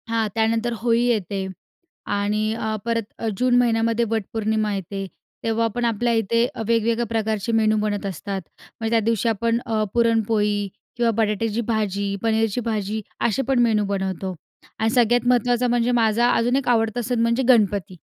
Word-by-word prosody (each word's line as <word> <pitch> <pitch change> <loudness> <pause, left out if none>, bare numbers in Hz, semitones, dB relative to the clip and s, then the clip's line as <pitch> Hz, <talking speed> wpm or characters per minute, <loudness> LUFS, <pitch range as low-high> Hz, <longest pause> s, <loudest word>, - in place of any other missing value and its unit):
हां. 225 -1 +1
त्यानंतर 225 +1 +1
होळी 235 0 +2
येते 200 -5 -1 0.7
आणि 205 +1 0
अ, 220 -1 -2
परत 230 -1 0 0.2
अ, 225 - -2
जून 250 +2 +2
महिन्यामध्ये 230 -1 +2
वटपौर्णिमा 220 0 -1
येते. 195 +1 -5 0.4
तेव्हा 230 0 +1
पण 240 0 0
आपल्या 235 +1 +1
इथे 230 +1 +2
अ, 230 - -5
वेगवेगळ्या 230 +1 +1
प्रकारचे 220 -1 -1
मेनू 220 -1 +3
बनत 205 -1 -2
असतात. 195 +1 -4 0.4
म्हणजे 225 0 -2
त्या 230 - +4
दिवशी 230 0 +1
अ, - - +3
आपण 230 +2 0 0.3
पुरणपोळी 220 -3 +1 0.3
किंवा 235 -1 +2
बटाट्याची 220 +1 0
भाजी, 200 -3 -1
पनीरची 225 0 +1
भाजी 215 -2 -2 0.3
असे 235 +4 0
पण 270 -2 +2
मेनू 225 -3 +3
बनवतो 190 -1 -3 0.4
आणि 220 - +2
सगळ्यात 240 0 +2
महत्त्वाचं 245 0 +2
म्हणजे 240 0 +2
माझा 235 0 +3
अजून 240 +2 +2
एक 275 -1 -1
आवडता 225 0 +1
सण 240 +1 -1
म्हणजे 235 +3 +2
गणपती. 205 -6 +3
225 Hz, 160 wpm, -22 LUFS, 210-235 Hz, 0.7 s, त्या